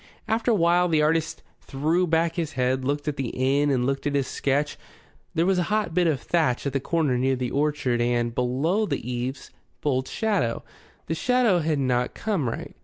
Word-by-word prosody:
After 225 +2 0
a 230 - +4
while 175 0 +3
the 155 -3 +2
artist 160 +1 0 0.2
threw 160 +6 0
back 165 0 +1
his 165 -2 -3
head, 130 0 0
looked 145 +2 -2
at 150 - -2
the 135 -4 -2
inn 140 +3 +2
and 125 -3 +1
looked 135 +2 -1
at 145 - -1
his 140 -2 +1
sketch. 140 +3 -1 0.6
There 165 - +2
was 190 -1 +2
a 175 - -1
hot 210 -5 0
bit 175 0 +3
of 150 -5 +1
thatch 140 0 0
at 140 - -2
the 135 - +1
corner 145 -4 0
near 130 +1 +2
the 125 -1 -3
orchard, 140 -4 0
and, 120 -1 0
below 145 - 0
the 120 - -3
eaves, 125 +2 -4 0.3
bold 130 -3 0
shadow. 200 - -1 0.4
The 160 - -2
shadow 240 0 +2
had 155 -2 0
not 125 -2 0
come 190 - -1
right. - - -6
145 Hz, 200 wpm, -25 LUFS, 130-170 Hz, 0.6 s, a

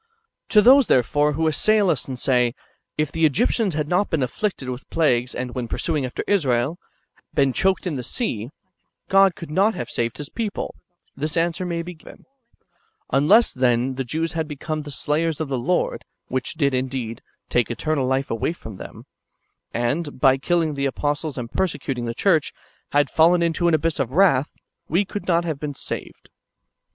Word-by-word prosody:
To 210 -2 +6
those, 265 +2 +7
therefore, 145 +4 +3
who 160 +3 0
assail 200 +5 +3
us, 140 - -3
and 130 -2 -5
say. 125 -1 +2 0.4
If 150 -1 0
the 165 - -2
Egyptians 195 - +2
had 150 -1 -1
not 180 +5 +1
been 160 -5 0
afflicted 170 - -2
with 125 +1 -6
plagues, 125 -6 +1
and, 125 -1 -4
when 125 -2 -3
pursuing 150 +1 -1
after 125 - -5
Israel, 145 -5 +1 0.6
been 140 -2 +3
choked 190 +5 +1
in 165 -6 -2
the - - -3
sea, 120 - -3 0.6
God 195 -1 +5
could 165 -3 -9
not 200 +7 +3
have 120 0 -5
saved 115 0 -2
His 150 - -6
people, 215 +2 -4 0.4
this 150 +3 -2
answer 170 +2 0
may 170 -1 -2
be 180 +1 -7
given; 155 - -15 0.4
— 445 -1 -43
Unless, 190 - +5
then, 125 0 +1
the 135 +1 -3
Jews 160 +6 -2
had 160 -2 -2
become 155 +1 -4
the 150 - -9
slayers 150 +3 -1
of 155 -3 -3
the 130 -2 -1
Lord 175 +9 0 0.3
(which 130 0 -2
did, 140 -3 +1
indeed, 130 -3 -3 0.3
take 120 -1 +1
eternal 135 +3 -1
life 130 +1 0
away 115 +8 -1
from 110 - -10
them), - - -10 0.7
and, 140 +6 -2
by 135 0 +5
killing 165 +2 0
the 140 -1 0
apostles 145 +1 -2
and 120 -2 -5
persecuting 135 -9 -2
the 115 0 -4
church, 165 -7 +2 0.4
had 145 0 +3
fallen 170 +4 +4
into 170 +1 +1
an 170 - +4
abyss 160 0 -1
of 130 -1 -1
wrath, 155 -6 +4 0.4
we 180 +6 +2
could 205 - -6
not 170 -1 +2
have 155 -4 -3
been 145 -1 -4
saved. - - -7
150 Hz, 185 wpm, -23 LUFS, 130-170 Hz, 0.7 s, those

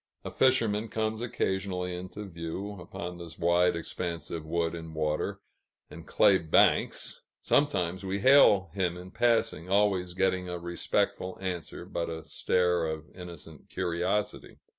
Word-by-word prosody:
A - - -4
fisherman 115 -5 +2
comes 110 0 -2
occasionally 95 -5 -2
into 95 +4 -7
view, 85 +2 -5
upon 90 0 -7
this 85 -1 -8
wide 85 +1 +3
expanse 85 0 -4
of 80 -2 -5
wood 85 0 0
and 80 -1 -7
water 75 -1 -1 0.5
and - - -11
clay 95 -1 +5
banks; 80 -2 +2 0.2
sometimes 95 -10 +1
we 95 +1 -2
hail 100 - +6
him 90 -3 -1
in 90 +1 -10
passing, 115 -7 +1
always 95 -3 +2
getting 90 -1 +1
a 90 - -3
respectful 85 +1 -1
answer, 90 -3 -5
but 85 - -3
a 80 -1 -5
stare 90 -2 +1
of 80 -1 -5
innocent 85 -4 -10
curiosity. 90 +5 -2
90 Hz, 140 wpm, -29 LUFS, 85-100 Hz, 0.5 s, hail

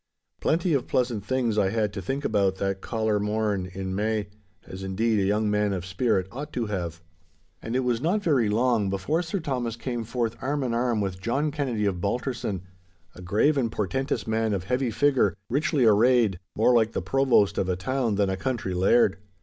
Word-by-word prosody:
Plenty 170 +1 +1
of 135 -4 0
pleasant 120 -5 0
things 120 -3 0
I 95 -2 +2
had 105 -1 -1
to 100 - -4
think 135 +9 -3
about 100 -3 +2
that 95 0 -2
caller 110 -2 0
morn 105 -2 -1
in 95 0 -4
May, 105 +1 -1 0.4
as 95 - -9
indeed 105 +3 0
a - - +2
young 105 +2 +1
man 105 -1 +1
of 90 -2 -4
spirit 95 0 0
ought 145 +6 -6
to 120 - -1
have. 85 -5 -4 0.6
And 115 - -4
it 130 - +2
was 125 -2 0
not 195 +7 +1
very 135 - +2
long 115 -2 +2
before 100 - 0
Sir 180 +3 -3
Thomas 125 -7 -2
came 120 0 -4
forth 115 0 -2
arm 140 +1 -1
in 120 -2 -1
arm 120 -2 +1
with 95 -2 -3
John 140 +8 0
Kennedy 130 -8 -1
of 95 -3 -1
Balterson, 105 -3 -2 0.5
a 90 - -12
grave 110 - +2
and 115 -4 0
portentous 120 +3 -2
man 110 -1 0
of 95 - -3
heavy 125 +4 0
figure, 125 - +2 0.2
richly 145 -1 +2
arrayed, 110 -2 +4 0.2
more 115 +3 +4
like 115 -2 +3
the - - -1
provost 135 -7 +3
of 95 - 0
a 90 - +1
town 115 +3 -1
than 100 -1 +1
a - - 0
country 110 -3 -2
laird. 95 +2 +3
110 Hz, 200 wpm, -26 LUFS, 100-130 Hz, 0.6 s, arrayed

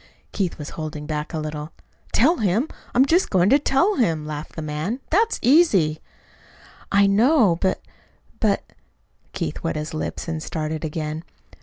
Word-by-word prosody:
Keith 185 -4 -2
was 150 - -7
holding 155 -2 -6
back 150 0 -3
a 165 - -3
little. 155 0 -5 0.4
"Tell 315 +9 +4
him! 215 - +1 0.3
I'm 255 +2 +6
just 340 +6 +2
going 185 +1 +3
to 280 - +6
tell 305 +9 +2
him," 165 - +1
laughed 150 0 -6
the 160 - -5
man. 155 - -3
"That's 440 +7 +3
easy." 205 - +4 0.9
"I 200 0 +5
know; 215 - +4
but 190 - 0 0.6
but - - +1 0.4
" - - -40
Keith - - -4
wet - - -2
his 150 0 -4
lips 155 - -4
and 160 -1 -3
started 155 0 -4
again. 155 0 -4
170 Hz, 160 wpm, -23 LUFS, 155-245 Hz, 0.9 s, I'm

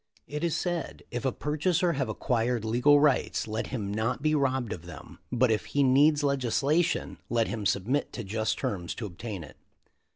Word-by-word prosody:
"It 150 +2 -5
is 170 -1 +1
said, 175 -1 -3
if 120 +1 -4
a 130 - +2
purchaser 170 +5 0
have 135 -3 -1
acquired 120 -2 0
legal 125 +6 +5
rights, 145 -6 +2
let 110 +1 -3
him 105 -6 -3
not 115 +5 -1
be 155 0 +3
robbed 130 -5 +1
of 85 -1 -9
them, 85 -4 -11
but 125 -1 +3
if 110 - 0
he 145 - +1
needs 145 +3 +4
legislation 140 +4 +1
let 115 -2 +1
him 110 -3 -1
submit 120 +9 0
to 120 - -5
just 110 +2 -1
terms 90 -4 -3
to 115 - -5
ob 90 -4 -10
tain 105 -7 -5
it. - - -13
125 Hz, 190 wpm, -28 LUFS, 110-145 Hz, -, legal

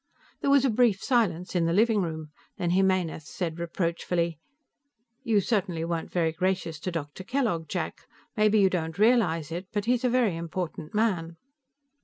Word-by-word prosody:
There - - +1
was 275 -1 +5
a 260 - +3
brief 220 -4 +2
silence 190 -9 +1
in 170 -2 +2
the 165 - +1
living 215 +1 +3
room. 160 -3 -4 0.3
Then 175 -1 -1
Jimenez 185 -5 +1
said 170 -2 -4
reproachfully: 170 -1 -1 0.8
"You 220 -3 +2
certainly 185 -6 -1
weren't 165 -1 -3
very 165 -2 +1
gracious 175 -2 -1
to 185 - -3
Dr. 165 +1 -5
Kellogg, 220 - -1
Jack. - - -4 0.3
Maybe 215 0 +4
you 195 -1 +5
don't 160 -3 -2
realize 195 - +3
it, 175 +3 -5
but 205 -1 -2
he 245 - +3
is 250 0 -1
a 250 - +3
very 240 -7 +2
important 170 0 -5
man." 175 -7 0
180 Hz, 170 wpm, -27 LUFS, 165-215 Hz, 0.8 s, was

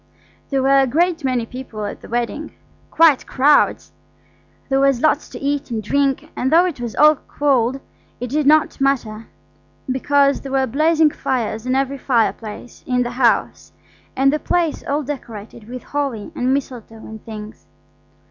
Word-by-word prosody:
There 270 -2 0
were 275 +1 +5
a 270 - +3
great 335 +4 +1
many 255 -3 0
people 230 -4 -7
at - - -7
the - - -12
wedding–quite 290 +4 0
crowds. 285 +3 +2 0.8
There 270 -1 +1
was 275 -2 +3
lots 310 -1 +2
to - - -9
eat 285 0 -2
and 225 -2 -3
drink, 275 +4 0
and 260 - -1
though 340 +3 +6
it 325 -9 -4
was 235 -2 -5
all 305 0 +6
cold, 270 -3 +1 0.4
it 250 -1 -5
did 295 0 +1
not 305 -2 +3
matter, 230 -5 -1 0.6
because 280 +2 +2
there 270 -1 -7
were 265 -1 +2
blazing 310 +4 +2
fires 235 -4 -3
in 255 - +1
every 270 +1 -1
fireplace 230 -2 -2
in 250 -1 +1
the 240 - -4
house, 245 -1 0 0.4
and 275 +1 +3
the 305 - 0
place 335 -2 -1
all 290 +2 0
decorated 230 -5 -8
with 250 0 -7
holly 275 -7 -3
and 255 +1 -1
mistletoe 250 -5 -3
and 220 -1 -11
things. 215 -1 -10
265 Hz, 160 wpm, -20 LUFS, 240-285 Hz, 0.8 s, though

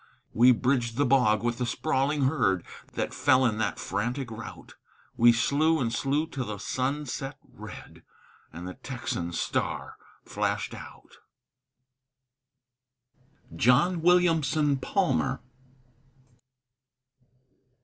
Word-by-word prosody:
We 125 +3 +6
bridged 120 -1 0
the 145 - +3
bog 120 -5 +3
with 120 0 -1
the 125 - 0
sprawling 140 +4 0
herd 120 - +1 0.3
That - - -3
fell 130 0 +3
in 110 -3 0
that 100 -3 -1
frantic 120 +5 -3
rout; 110 - -9 0.4
We 120 +1 +6
slew 150 +7 +2
and 115 -3 -1
slew 145 +5 0
till 135 -5 -5
the 105 -2 -5
sun 135 +8 -2
set 135 +1 -5
red, - - -11 0.5
And 85 +3 -8
the 90 - -6
Texan 120 -10 -5
star - - -3 0.3
flashed - - -2
out. - - -12 2.4
JOHN 155 +8 +3
WILLIAMSON 160 -5 +3
PALMER. 165 -1 0
130 Hz, 110 wpm, -27 LUFS, 115-145 Hz, 2.4 s, We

